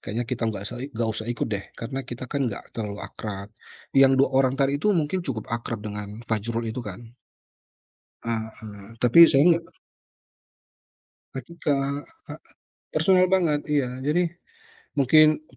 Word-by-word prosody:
kayaknya 115 +4 -3
kita 120 0 -4
nggak 100 -2 -5
usa - - -5
nggak 115 -3 -2
usah 110 +1 -5
ikut, 120 - -1
deh, 100 -1 -2
karena 135 +4 -4
kita, 125 +1 -6
kan, 135 0 -1
nggak 100 - -8
terlalu 105 -3 -5
akrab. 100 0 -7 0.4
Yang 135 -1 +6
2 - - -2
orang 130 -1 +3
tadi 140 +1 +1
itu 210 - +1
mungkin 170 +2 0
cukup 125 -10 -4
akrab 115 -2 -3
dengan 105 +2 -6
Fajrul 115 +1 -2
itu, 125 - -4
kan. 105 -3 -7 1.2
Heeh, 110 -2 -6
tapi 125 +6 +5
saya 140 -3 +4
nggak 170 0 +2 1.7
Ketika 140 0 -2 0.2
a - - -5 0.6
personal 185 +4 +4
banget, 170 -6 +1
iya. 130 -4 0
Jadi, 150 +7 +1 0.7
mungkin 155 +2 +5
125 Hz, 145 wpm, -25 LUFS, 110-145 Hz, 1.7 s, Yang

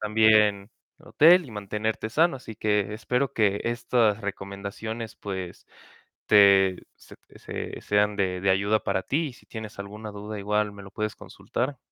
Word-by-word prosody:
también, 105 -1 +3 0.3
el - - -21
hotel, 175 +4 +6
y - - -12
mantenerte 105 +1 -3
sano. 160 +4 +2
Así 115 -3 -10
que 105 -1 0
espero, 125 +4 -1
que 100 -2 +1
estas 120 -2 +1
recomendaciones, 100 +3 -6
pues, 95 -3 -7 0.6
te 100 -2 +5
se - - -16 0.2
se - - -6
sean 105 0 +1
de 90 -2 -1
de 100 +1 +2
ayuda 100 +3 +2
para 95 - -1
ti, 150 - -1
y - - -10
si 120 - -20
tienes 110 -3 -8
alguna 105 +2 -7
duda, 105 +1 -7
igual 105 +1 0
me 100 0 -11
lo 100 - -12
puedes 105 +1 -3
consultar. 130 +3 -5
105 Hz, 160 wpm, -26 LUFS, 100-110 Hz, 0.6 s, hotel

